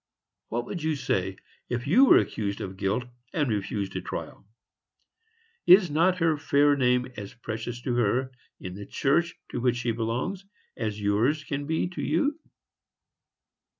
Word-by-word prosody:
What 120 Hz, +1 st, -2 dB
would 170 Hz, -, -5 dB
you 155 Hz, 0 st, 0 dB
say, 95 Hz, -8 st, -1 dB, 0.3 s
if 120 Hz, 0 st, -2 dB
you 230 Hz, -, +6 dB
were -, -, +7 dB
accused 100 Hz, -2 st, -1 dB
of 95 Hz, 0 st, -5 dB
guilt, 100 Hz, +5 st, 0 dB, 0.3 s
and 150 Hz, -3 st, +1 dB
refused 100 Hz, -2 st, -2 dB
a -, -, -2 dB
trial? -, -, -7 dB, 1.2 s
Is 180 Hz, -2 st, +7 dB
not 180 Hz, +5 st, +3 dB
her 165 Hz, -3 st, +2 dB
fair 145 Hz, 0 st, +4 dB
name 125 Hz, -2 st, +2 dB
as 100 Hz, -2 st, -7 dB
precious 120 Hz, 0 st, -5 dB
to 125 Hz, -, -1 dB
her, 120 Hz, +3 st, +1 dB, 0.3 s
in 90 Hz, -, -7 dB
the 100 Hz, +2 st, -8 dB
church 170 Hz, +5 st, +1 dB, 0.2 s
to -, -, -3 dB
which 125 Hz, -1 st, +2 dB
she 120 Hz, -1 st, -1 dB
belongs, 120 Hz, -, -2 dB, 0.3 s
as 105 Hz, -2 st, -3 dB
yours 110 Hz, +9 st, +1 dB
can 145 Hz, -1 st, -4 dB
be 160 Hz, +2 st, 0 dB
to 180 Hz, -, -6 dB
you? 295 Hz, +2 st, 0 dB
125 Hz, 155 wpm, -27 LUFS, 110-155 Hz, 1.2 s, were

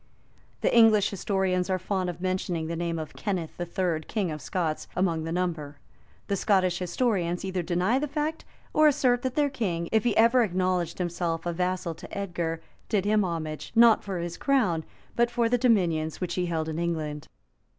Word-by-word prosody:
[] -, -, -34 dB
The -, -, +2 dB
English 220 Hz, -3 st, +6 dB
historians 190 Hz, -2 st, 0 dB
are 185 Hz, -, +2 dB
fond 185 Hz, 0 st, -2 dB
of 175 Hz, 0 st, -7 dB
mentioning 185 Hz, -3 st, -1 dB
the 165 Hz, +1 st, -3 dB
name 170 Hz, 0 st, -2 dB
of 155 Hz, -2 st, -6 dB
Kenneth 180 Hz, -7 st, -4 dB
III., 175 Hz, -2 st, -1 dB
king 200 Hz, -7 st, -1 dB
of 150 Hz, -1 st, -6 dB
Scots, 160 Hz, +1 st, -2 dB
among 170 Hz, -4 st, 0 dB
the 165 Hz, -, -3 dB
number: 165 Hz, -5 st, -2 dB, 0.5 s
the 200 Hz, -, -1 dB
Scottish 185 Hz, -3 st, +2 dB
historians 180 Hz, -2 st, 0 dB
either 190 Hz, -1 st, -1 dB
deny 180 Hz, +8 st, +1 dB
the 300 Hz, -, -1 dB
fact, 300 Hz, +2 st, -2 dB, 0.3 s
or 310 Hz, 0 st, +6 dB
assert 250 Hz, -4 st, +3 dB
that 260 Hz, -1 st, -3 dB
their 290 Hz, -2 st, +2 dB
king, 175 Hz, -10 st, -2 dB
if 220 Hz, -1 st, +3 dB
ever 230 Hz, +3 st, +5 dB
he -, -, +4 dB
acknowledged 180 Hz, -2 st, 0 dB
himself 170 Hz, -2 st, -2 dB
a 175 Hz, -, -1 dB
vassal 180 Hz, -1 st, -1 dB
to -, -, -9 dB
Edgar, 170 Hz, -4 st, -3 dB, 0.3 s
did 200 Hz, -3 st, +1 dB
him 210 Hz, 0 st, +3 dB
homage, 160 Hz, -4 st, -4 dB
not 230 Hz, -1 st, +6 dB
for 195 Hz, -2 st, -4 dB
his 170 Hz, 0 st, -4 dB
crown, 220 Hz, -, +1 dB, 0.3 s
but 235 Hz, 0 st, +3 dB
for 235 Hz, -1 st, +1 dB
the 245 Hz, +1 st, +1 dB
dominions 175 Hz, -, +2 dB
which 180 Hz, -2 st, -3 dB
he 180 Hz, 0 st, -1 dB
held 160 Hz, -2 st, -1 dB
in 160 Hz, +1 st, -3 dB
England. 155 Hz, -3 st, -3 dB
180 Hz, 190 wpm, -27 LUFS, 170-215 Hz, 0.5 s, English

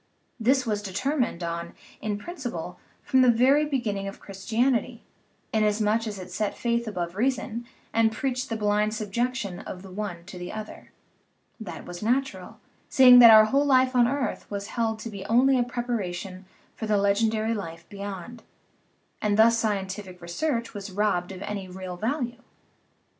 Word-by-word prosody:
This 255 Hz, +3 st, +2 dB
was 210 Hz, -2 st, -1 dB
determined 210 Hz, -, -1 dB
on, 170 Hz, 0 st, -4 dB, 0.3 s
in 210 Hz, -1 st, -2 dB
principle, 215 Hz, -, -6 dB, 0.2 s
from 260 Hz, -2 st, +3 dB
the 255 Hz, -, +6 dB
very 265 Hz, +6 st, +4 dB
beginning 220 Hz, -9 st, -2 dB
of 195 Hz, -, -7 dB
Christianity, 230 Hz, +4 st, -1 dB, 0.5 s
inasmuch 215 Hz, +1 st, +1 dB
as 210 Hz, -2 st, -5 dB
it 185 Hz, -1 st, -9 dB
set 205 Hz, +3 st, -2 dB
faith 235 Hz, -1 st, 0 dB
above 175 Hz, -4 st, -4 dB
reason 240 Hz, 0 st, -1 dB, 0.3 s
and 225 Hz, 0 st, +3 dB
preached 255 Hz, +2 st, -2 dB
the 225 Hz, -, -2 dB
blind 210 Hz, 0 st, +1 dB
subjection 220 Hz, -1 st, -2 dB
of 185 Hz, 0 st, -8 dB
the 190 Hz, -, -11 dB
one 185 Hz, -4 st, -5 dB
to 185 Hz, -1 st, -9 dB
the 175 Hz, -, -6 dB
other; 215 Hz, 0 st, -8 dB, 0.7 s
that 220 Hz, -5 st, -8 dB
was 175 Hz, 0 st, -8 dB
natural, 230 Hz, -5 st, -1 dB, 0.3 s
seeing 250 Hz, -2 st, +8 dB
that 235 Hz, -1 st, +10 dB
our 215 Hz, -1 st, +9 dB
whole 275 Hz, +6 st, +2 dB
life 260 Hz, -1 st, +4 dB
on 240 Hz, -1 st, +5 dB
earth 265 Hz, -3 st, -2 dB
was 200 Hz, 0 st, -5 dB
held 225 Hz, -2 st, 0 dB
to 230 Hz, -, -5 dB
be 200 Hz, -2 st, -7 dB
only 255 Hz, +3 st, +4 dB
a -, -, +3 dB
preparation 200 Hz, -7 st, -4 dB, 0.3 s
for 220 Hz, -, -5 dB
the 210 Hz, -1 st, +2 dB
legendary 215 Hz, +2 st, +1 dB
life 170 Hz, -5 st, -6 dB
beyond, 200 Hz, +3 st, -7 dB, 0.8 s
and 210 Hz, -1 st, +1 dB
thus 230 Hz, +1 st, +5 dB
scientific 195 Hz, -3 st, -3 dB
re 170 Hz, -, -11 dB
search 235 Hz, -, -2 dB
was 205 Hz, -1 st, -6 dB
robbed 185 Hz, -2 st, 0 dB
of 190 Hz, +1 st, -7 dB
any 200 Hz, -2 st, -4 dB
real 185 Hz, 0 st, -7 dB
value. 240 Hz, -, -3 dB
215 Hz, 165 wpm, -26 LUFS, 195-240 Hz, 0.8 s, that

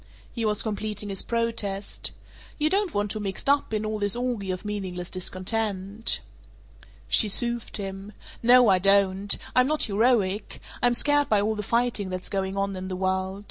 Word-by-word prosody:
He 230 Hz, -2 st, -2 dB
was 210 Hz, +1 st, +1 dB
completing 210 Hz, -1 st, -2 dB
his 195 Hz, -1 st, -1 dB
protest, 225 Hz, -4 st, -2 dB, 0.5 s
"You 305 Hz, +1 st, +1 dB
don't 395 Hz, -2 st, +1 dB
want 205 Hz, 0 st, -1 dB
to 215 Hz, -, -3 dB
be 210 Hz, -, -5 dB
mixed 195 Hz, +6 st, -4 dB
up 280 Hz, -2 st, +2 dB
in 215 Hz, 0 st, -1 dB
all 215 Hz, 0 st, -3 dB
this 205 Hz, 0 st, +3 dB
orgy 240 Hz, -5 st, -3 dB
of 185 Hz, +3 st, -4 dB
meaningless 185 Hz, -4 st, -5 dB
discontent?" 195 Hz, +3 st, -1 dB, 0.9 s
She 215 Hz, -, +5 dB
soothed 235 Hz, +3 st, 0 dB
him. 195 Hz, 0 st, -7 dB, 0.3 s
"No, 245 Hz, +1 st, +6 dB
I 190 Hz, -2 st, +5 dB
don't. 195 Hz, +1 st, +3 dB, 0.2 s
I'm 255 Hz, 0 st, +5 dB
not 305 Hz, +1 st, +2 dB
heroic. 210 Hz, -2 st, +1 dB, 0.2 s
I'm 245 Hz, 0 st, +3 dB
scared 290 Hz, +3 st, +2 dB
by 210 Hz, -, +4 dB
all 210 Hz, +2 st, 0 dB
the 210 Hz, -, -4 dB
fighting 230 Hz, -2 st, 0 dB
that's 185 Hz, 0 st, -6 dB
going 195 Hz, 0 st, -2 dB
on 195 Hz, 0 st, -1 dB
in 185 Hz, 0 st, -6 dB
the 185 Hz, -, -4 dB
world. 190 Hz, +1 st, -2 dB
205 Hz, 180 wpm, -25 LUFS, 195-230 Hz, 0.9 s, No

